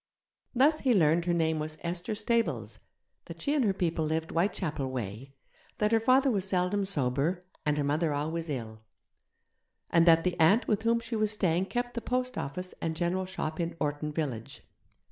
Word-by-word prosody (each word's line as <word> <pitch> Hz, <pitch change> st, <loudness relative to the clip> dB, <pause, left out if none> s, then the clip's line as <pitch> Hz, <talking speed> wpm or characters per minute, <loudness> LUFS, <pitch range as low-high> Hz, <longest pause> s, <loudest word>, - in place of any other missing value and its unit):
Thus 295 Hz, +5 st, +4 dB
he 255 Hz, -4 st, +2 dB
learned 170 Hz, -1 st, +3 dB
her 175 Hz, -, +1 dB
name 160 Hz, -1 st, +1 dB
was 155 Hz, 0 st, -4 dB
Esther 175 Hz, +5 st, -2 dB
Stables, 230 Hz, +2 st, -1 dB, 0.5 s
that -, -, -10 dB
she 285 Hz, -, 0 dB
and 290 Hz, -3 st, +2 dB
her 205 Hz, -, +3 dB
people 170 Hz, -4 st, -1 dB
lived 160 Hz, +1 st, -2 dB
Whitechapel 165 Hz, -6 st, -1 dB
way; 125 Hz, +2 st, -6 dB, 0.4 s
that 210 Hz, 0 st, +1 dB
her 225 Hz, -, +4 dB
father 260 Hz, +4 st, +4 dB
was 195 Hz, -4 st, +1 dB
seldom 190 Hz, +2 st, +1 dB
sober, 150 Hz, +1 st, 0 dB, 0.2 s
and 150 Hz, 0 st, +2 dB
her 145 Hz, -, +1 dB
mother 150 Hz, +3 st, +1 dB
always 160 Hz, +3 st, -2 dB
ill; 110 Hz, -6 st, -5 dB, 1.1 s
and 170 Hz, 0 st, +4 dB
that 165 Hz, -1 st, +6 dB
the 180 Hz, -1 st, -1 dB
aunt 180 Hz, +9 st, +4 dB
with 210 Hz, -1 st, +1 dB
whom 230 Hz, +1 st, +2 dB
she 230 Hz, 0 st, -4 dB
was 215 Hz, -1 st, +2 dB
staying 185 Hz, -2 st, +1 dB
kept 245 Hz, +1 st, -2 dB
the 235 Hz, -, -3 dB
post 255 Hz, +1 st, -2 dB
office 180 Hz, +6 st, -4 dB
and 160 Hz, -1 st, -2 dB
general 180 Hz, +2 st, -1 dB
shop 160 Hz, -4 st, -4 dB
in 170 Hz, 0 st, -2 dB
Orton 150 Hz, 0 st, -2 dB
village. 135 Hz, -8 st, -4 dB
170 Hz, 185 wpm, -29 LUFS, 155-210 Hz, 1.1 s, that